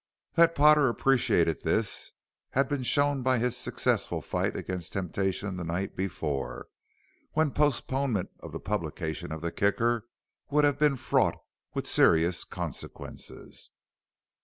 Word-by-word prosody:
That 165 -1 +5
Potter 150 -2 +6
appreciated 115 - +2
this - - -1 0.4
had 135 +1 +2
been 145 -1 -2
shown 145 +2 +2
by 130 0 +2
his 125 +1 +1
successful 125 - 0
fight - - -2
against 90 -3 -4
temptation 95 +1 -2
the 90 - -4
night 85 +4 -3
before, 80 -7 -3 0.6
when 155 -2 +2
postponement 135 -6 0
of - - -9
the - - -5
publication 85 -6 -3
of 80 0 -5
the 85 0 -2
Kicker 115 +4 +1 0.4
would 150 +1 +3
have 145 -1 +2
been 150 -2 +3
fraught - - +2 0.4
with - - -2
serious 85 +2 +4
consequences. 85 -7 -8
115 Hz, 130 wpm, -28 LUFS, 90-140 Hz, 0.6 s, Potter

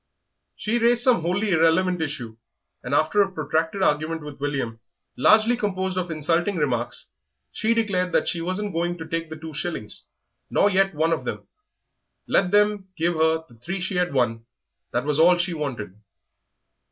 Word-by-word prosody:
She 230 +3 -1
raised 235 +1 +4
some 245 -9 +4
wholly 190 +5 0
irrelevant 170 +2 +3
issue, 125 -8 -4 0.5
and 125 +3 -2
after 155 +8 +3
a 195 -1 +1
protracted 160 +3 -1
argument 155 0 0
with 145 -2 -9
William, 135 -6 -3 0.4
largely 220 - +5
composed 190 -5 -2
of 180 -1 -2
insulting 165 +5 0
remarks, 125 -7 -2 0.4
she 225 +2 0
declared 190 -5 0
that - - +1
she 170 - 0
wasn't 185 +4 -2
going 175 +1 -1
to 160 - -7
take 165 0 -3
the 160 - -6
two 160 0 -9
shillings, 150 -9 -5 0.4
nor 205 - +3
yet 195 -2 +2
one 160 +2 +2
of 165 - -2
them; - - -5 0.8
let 185 - +2
them 205 -1 +2
give 170 +1 +1
her 160 0 +2
the 115 -2 -20
three 190 +9 -4
she 185 +1 -2
had 180 -2 +1
won 120 -4 0 0.4
that 120 +3 -2
was 150 0 0
all 175 +2 +6
she 175 0 0
wanted. 135 - -4
165 Hz, 170 wpm, -24 LUFS, 150-190 Hz, 0.8 s, all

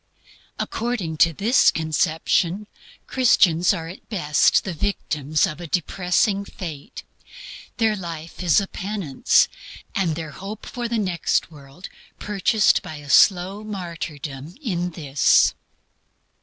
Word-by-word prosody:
According 225 -9 -3
to 165 - +5
this 220 - +4
conception, 165 +4 0 0.4
Christians 180 -9 +3
are 165 -5 -3
at 180 +4 -12
best 150 -9 +2
the 190 - -4
victims 155 -5 -1
of 155 - -6
a 175 - -6
depressing 185 +4 0
fate; 160 -7 -8 0.7
their 220 -2 +2
life 170 -4 -7
is 175 +1 +4
a 200 - -2
penance; 190 -8 +1 0.5
and 175 -5 0
their 160 -1 -6
hope 195 +8 -8
for 240 -1 -4
the 235 0 -1
next 185 -4 0
world 145 +4 -12 0.3
purchased 210 +1 +2
by 160 - -8
a 145 -1 -7
slow 190 +2 +4
martyrdom 165 -7 -6
in 180 - -2
this. 145 -5 +3
175 Hz, 120 wpm, -22 LUFS, 155-200 Hz, 0.7 s, to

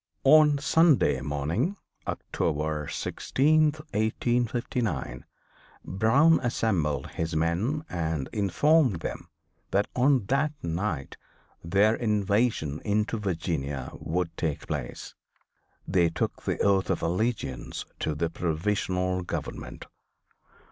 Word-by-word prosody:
On 150 +1 +7
Sunday 140 - +3
morning, 80 - -1 0.3
October 75 -1 -2
16th, 155 +2 +1
1859, 120 - -1 0.6
Brown 135 - +4
assembled 85 - 0
his 80 -1 -3
men 90 - 0
and 80 -5 -2
informed 120 - +3
them - - -5 0.4
that 100 +1 +2
on 130 -3 +3
that 140 +6 +1
night 85 -4 -3 0.5
their 100 +6 +3
invasion 105 - 0
into 105 +2 0
Virginia 80 -8 -3
would 85 0 -3
take 80 -4 -2
place. - - -5 0.7
They 85 -2 +3
took 80 - -3
the - - 0
oath 95 -1 +3
of 90 -3 -1
allegiance 105 +8 -2
to 75 - -1
the 80 +2 -1
"Provisional 90 +2 -1
Government." 90 - -6
100 Hz, 100 wpm, -27 LUFS, 80-125 Hz, 0.7 s, On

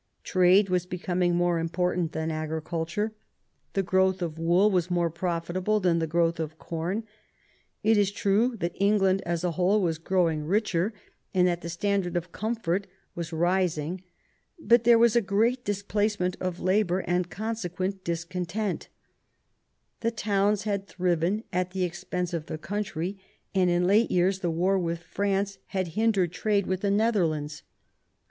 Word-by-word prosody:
Trade 185 +2 +4
was 180 -1 0
becoming 180 -1 0
more 175 -1 +2
important 175 0 -1
than 160 +1 -2
agriculture; 160 +6 -3 0.6
the 195 - +1
growth 190 0 +2
of 160 -2 -4
wool 175 +6 +4
was 180 -2 +1
more 175 -2 +1
profitable 175 +4 -1
than 175 -3 +2
the 160 - -1
growth 165 +1 +1
of 160 0 -4
com. 170 +8 -3 0.8
It 220 0 +4
is 200 -2 +3
true 215 +4 +1
that 175 -3 -2
England 195 -1 +3
as 170 0 -1
a 180 - +1
whole 185 +5 +2
was 165 -4 0
growing 165 -3 +1
richer, 190 +2 +1 0.4
and 180 -1 +5
that 175 -1 -1
the 170 - -6
standard 180 0 0
of 175 0 -4
comfort 205 -3 -2 0.3
was 170 -1 -5
rising; 175 0 0 0.6
but 235 -4 +4
there 235 -1 +7
was 235 -1 +4
a 235 - +5
great 230 +5 +1
displacement 205 -2 -1
of 185 -1 -3
labour, 185 -1 +2
and 180 0 -1
consequent 195 -3 -3
discon 170 +1 -3
tent 205 +2 -3 1.1
The 230 - +1
towns 205 -2 +1
had 200 -2 -2
thriven 180 +3 0
at 180 0 -1
the 190 -1 -1
expense 180 0 -3
of 160 -2 -3
the 155 - -4
country; 190 +1 -4 0.3
and 185 -2 +3
in 175 0 +2
late 210 +5 +4
years 185 +2 +2
the 175 - -1
war 185 +4 +1
with 170 -1 -3
France 200 +1 -1
had 185 -3 -2
hindered 200 -2 +1
trade 200 +1 0
with 185 0 -2
the 200 - +1
Netherlands. 170 -9 +1
185 Hz, 155 wpm, -27 LUFS, 170-200 Hz, 1.1 s, there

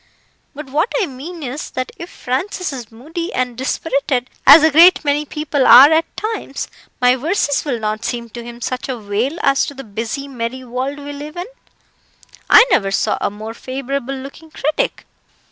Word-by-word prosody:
But 300 0 -8
what 315 - +1
I 415 - +2
mean 310 +4 -8
is, 270 +3 -5
that 255 0 -4
if 345 - -9
Francis 330 +6 -3
is 240 -4 -8
moody 325 +10 -6
and 250 -1 -1
dispirited, 260 0 -1 0.2
as 295 +3 +10
a 315 - +5
great 335 +2 +6
many 290 +1 +1
people 300 -2 -1
are 275 +5 +10
at 320 +1 +1
times, 430 -10 -4 0.3
my 250 0 +4
verses 290 +1 0
will 255 -5 -2
not 215 0 -3
seem 235 -1 -3
to 240 +1 -8
him 240 0 -10
such 255 +2 -4
a 255 - -2
wail 220 +8 -2
as 275 0 +3
to 285 - -7
the 270 - -8
busy, 225 +6 -5
merry 255 0 -5
world 255 +3 -4
we 290 0 -7
live 300 +3 -8
in. 355 - -3 1.0
I 460 - +9
never 195 - +3
saw 195 - 0
a - - +1
more 215 +2 -8
favourable 270 +2 -4
looking 275 +4 -10
critic." 310 - -2
275 Hz, 180 wpm, -18 LUFS, 245-305 Hz, 1.0 s, as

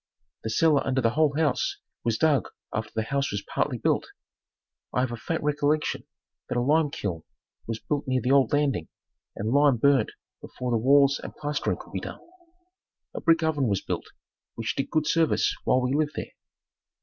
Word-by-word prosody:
The 110 - -3
cellar 150 +5 +3
under 130 0 0
the 115 -3 +2
whole 150 +1 +2
house 155 -5 +1 0.3
was 115 -1 +1
dug 150 -6 +3 0.3
after 110 0 -2
the 110 - 0
house 140 +4 -1
was 100 0 -3
partly - - -1
built. - - 0 0.9
I 125 - +3
have 130 -1 -1
a - - -3
faint 160 +8 -3
recollection 150 +1 0 0.4
that - - -1
a - - +3
limekiln 140 - 0 0.5
was 115 -1 -2
built 145 +4 -3
near 130 0 +2
the 125 +2 0
old 135 -4 +4
landing 140 - +1 0.5
and 110 +4 -2
lime 140 -3 +5
burnt 135 -2 +3 0.3
before 125 -1 -5
the 115 - +3
walls 140 +4 +4
and - - -8
plastering 145 0 -2
could - - -13
be - - -1
done. - - -7 0.9
A - - -5
brick 165 0 +3
oven 150 -5 +1
was 100 -2 0
built, - - -3 0.5
which 115 0 -3
did 135 - -2
good 155 -2 +1
service 165 +1 +2
while 130 - +3
we 125 +1 0
lived 150 0 +1
there. - - -5
140 Hz, 185 wpm, -26 LUFS, 115-150 Hz, 0.9 s, lime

